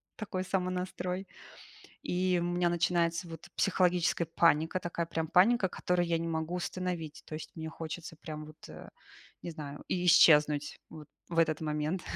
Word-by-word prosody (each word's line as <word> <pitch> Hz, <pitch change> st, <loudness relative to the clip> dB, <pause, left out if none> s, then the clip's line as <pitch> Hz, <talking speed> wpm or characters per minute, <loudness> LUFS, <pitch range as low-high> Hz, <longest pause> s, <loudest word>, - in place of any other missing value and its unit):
такой 185 Hz, -4 st, -4 dB
самонастрой. 185 Hz, 0 st, -2 dB, 0.8 s
И 180 Hz, 0 st, +1 dB
у -, -, -1 dB
меня 175 Hz, 0 st, +1 dB
начинается 170 Hz, 0 st, +1 dB
вот 165 Hz, -1 st, -9 dB
психологическая 180 Hz, -3 st, +2 dB
паника, 165 Hz, +2 st, +2 dB
такая 170 Hz, -1 st, -3 dB
прям 160 Hz, -1 st, -2 dB
паника, 190 Hz, +3 st, +4 dB
которую 175 Hz, 0 st, 0 dB
я 165 Hz, -1 st, +1 dB
не 165 Hz, -, -3 dB
могу 160 Hz, +2 st, -2 dB
остановить. 175 Hz, -3 st, -4 dB
То -, -, -8 dB
есть 155 Hz, -, -7 dB
мне 160 Hz, -1 st, -5 dB
хочется 165 Hz, +1 st, -7 dB
прям 155 Hz, -1 st, -7 dB
вот, 155 Hz, 0 st, -14 dB
э, -, -, -10 dB, 0.5 s
не 175 Hz, -, -5 dB
знаю, 145 Hz, -3 st, -8 dB
и 180 Hz, -1 st, -1 dB
исчезнуть 150 Hz, -3 st, +5 dB
вот 155 Hz, -2 st, -10 dB, 0.2 s
в 170 Hz, -, -3 dB
этот 160 Hz, -2 st, +3 dB
момент. 155 Hz, +4 st, -1 dB
170 Hz, 160 wpm, -31 LUFS, 160-180 Hz, 0.8 s, исчезнуть